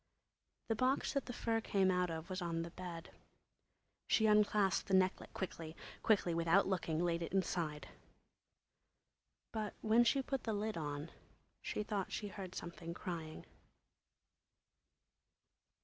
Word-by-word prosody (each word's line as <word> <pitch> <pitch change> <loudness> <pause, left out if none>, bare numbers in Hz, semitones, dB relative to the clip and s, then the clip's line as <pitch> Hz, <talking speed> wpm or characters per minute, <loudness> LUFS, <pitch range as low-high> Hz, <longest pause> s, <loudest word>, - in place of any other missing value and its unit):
The 225 - +1
box 255 +4 +1
that 275 -3 -1
the - - -3
fur 230 -2 0
came 195 -4 +3
out 180 -1 +2
of 160 0 -4
was 185 0 -3
on 165 -1 -1
the 170 - -7
bed. 175 -2 -7 1.0
She 220 - +4
unclasped 210 -2 +4
the 195 - +3
necklet 185 0 +2
quickly; 165 -4 -5 0.3
quickly, 200 -6 +3
without 170 +4 +4
looking, 175 -3 0
laid 170 -1 +1
it 170 - -3
inside. 170 -5 0 1.6
But 215 -2 -3
when 225 +2 +5
she 270 +3 +3
put 270 -1 -2
the 225 - 0
lid 210 +1 -1
on 150 0 -4 0.5
she 210 - -2
thought 205 -2 -2
she 205 - -3
heard 185 -2 -7
something 170 -1 -6
crying. 160 -4 -5
185 Hz, 135 wpm, -37 LUFS, 170-215 Hz, 1.6 s, when